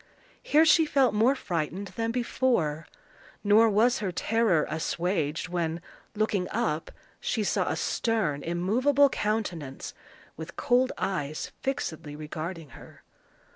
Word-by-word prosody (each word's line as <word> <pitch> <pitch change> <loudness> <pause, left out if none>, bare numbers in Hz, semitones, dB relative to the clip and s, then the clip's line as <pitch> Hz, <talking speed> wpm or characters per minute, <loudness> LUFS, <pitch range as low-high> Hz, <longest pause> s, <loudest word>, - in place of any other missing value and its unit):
Here 310 +2 +4
she 320 0 +5
felt 275 -5 +3
more 230 +6 +3
frightened 180 - -3
than 225 0 -3
before; 235 - 0 0.6
nor 220 +2 +5
was 235 +5 +3
her 195 -3 -2
terror 210 -2 +2
assuaged 165 -1 -1
when, 170 -2 -2 0.4
looking 205 -3 0
up, 205 -9 -1 0.3
she 220 - -1
saw - - 0
a - - 0
stern, 215 -11 -1
immovable 245 - +2
countenance, 180 - -3 0.4
with - - -8
cold 255 -1 +2
eyes 155 -6 -3
fixedly 170 - -3
regarding 155 +1 -6
her. - - -15
200 Hz, 120 wpm, -27 LUFS, 165-240 Hz, 0.6 s, she